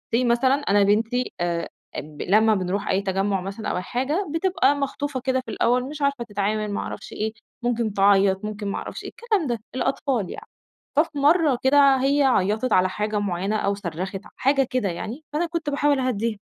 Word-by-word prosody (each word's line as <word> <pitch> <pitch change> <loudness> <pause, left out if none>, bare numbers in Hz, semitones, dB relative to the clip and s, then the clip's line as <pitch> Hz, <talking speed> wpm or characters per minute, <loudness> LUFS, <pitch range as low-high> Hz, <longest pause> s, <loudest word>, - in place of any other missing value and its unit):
say 250 +2 +2
مثلًا 240 +3 +3
أنا 205 -8 +2
بنتي 225 +5 +1
آآ، 170 -1 -1 0.3
ب 150 -1 -7
لمّا 215 +3 +4
بنروح 190 +1 -2
أي 190 +1 +2
تجَمُّع 195 0 0
مثلًا 195 +4 -5
أو - - -1
أي - - -1
حاجة 275 - -1
بتبقى 330 -6 +2
مخطوفة 285 -1 -3
كده 260 +1 0
في - - -6
الأول 250 +1 +2
مش 300 -1 -8
عارفة 280 -3 +1
تتعامل 210 -1 -2
ما - - -2
اعرفش - - -6
إيه، 220 +1 -2 0.3
ممكن 235 -3 0
تعيط، 195 0 +3
ممكن 210 -1 -5
ما 200 - -2
اعرفش - - -6
إيه، - - -6
الكلام 440 -8 -1
ده 240 -2 -1 0.2
الأطفال 260 -4 -1
يعني. - - -8 0.5
ففي 300 -1 +1
مَرّة 295 -1 +4
كده 275 0 +6
هي 280 +1 +3
عيّطِت 220 -1 +2
على 185 0 +4
حاجة 210 +2 -2
معينة 195 +1 -1
أو 200 -1 +1
صرّخِت 190 +1 -5
ع - - -13
حاجة 270 -1 +2
كده 250 -6 0
يعني، 225 - -6
فأنا 325 +3 +1
كنت 335 -3 -3
باحاول 285 -1 +2
أهَدّيها، 230 -3 -1
230 Hz, 195 wpm, -24 LUFS, 200-275 Hz, 0.5 s, كده